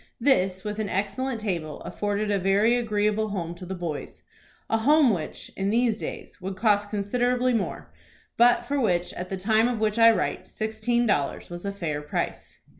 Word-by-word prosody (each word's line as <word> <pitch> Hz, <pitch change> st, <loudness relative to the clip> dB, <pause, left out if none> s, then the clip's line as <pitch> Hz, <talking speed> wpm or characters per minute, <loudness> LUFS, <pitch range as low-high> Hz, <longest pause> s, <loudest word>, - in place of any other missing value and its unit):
This, 190 Hz, -8 st, +2 dB
with 210 Hz, 0 st, -4 dB
an 210 Hz, -2 st, -2 dB
excellent 235 Hz, +5 st, -2 dB
table, 170 Hz, -8 st, -3 dB
afforded 205 Hz, 0 st, -2 dB
a 200 Hz, -, +2 dB
very 200 Hz, +5 st, +3 dB
agreeable 215 Hz, -2 st, +1 dB
home 175 Hz, -5 st, -3 dB
to 180 Hz, +1 st, -10 dB
the 190 Hz, -, -4 dB
boys, 170 Hz, -4 st, -6 dB, 0.4 s
a 225 Hz, -, +1 dB
home 285 Hz, 0 st, +5 dB
which, 165 Hz, -5 st, -5 dB
in 195 Hz, +1 st, -1 dB
these 230 Hz, 0 st, +2 dB
days, -, -, -7 dB
would 190 Hz, +1 st, -4 dB
cost 205 Hz, 0 st, +2 dB
considerably 245 Hz, +5 st, +1 dB
more, 225 Hz, -4 st, -3 dB, 0.4 s
but 240 Hz, +1 st, +4 dB
for 285 Hz, -1 st, 0 dB
which, 180 Hz, -6 st, +1 dB
at 180 Hz, +1 st, -6 dB
the 190 Hz, -, -3 dB
time 220 Hz, +4 st, +3 dB
of 245 Hz, -3 st, -2 dB
which 215 Hz, +1 st, 0 dB
I 230 Hz, 0 st, +9 dB
write, 225 Hz, -, -1 dB
sixteen 235 Hz, +2 st, -1 dB
dollars 160 Hz, -6 st, -1 dB
was 175 Hz, +3 st, -6 dB
a -, -, -1 dB
fair 165 Hz, -7 st, -3 dB
price. 150 Hz, -, -4 dB
210 Hz, 185 wpm, -26 LUFS, 190-230 Hz, 0.4 s, I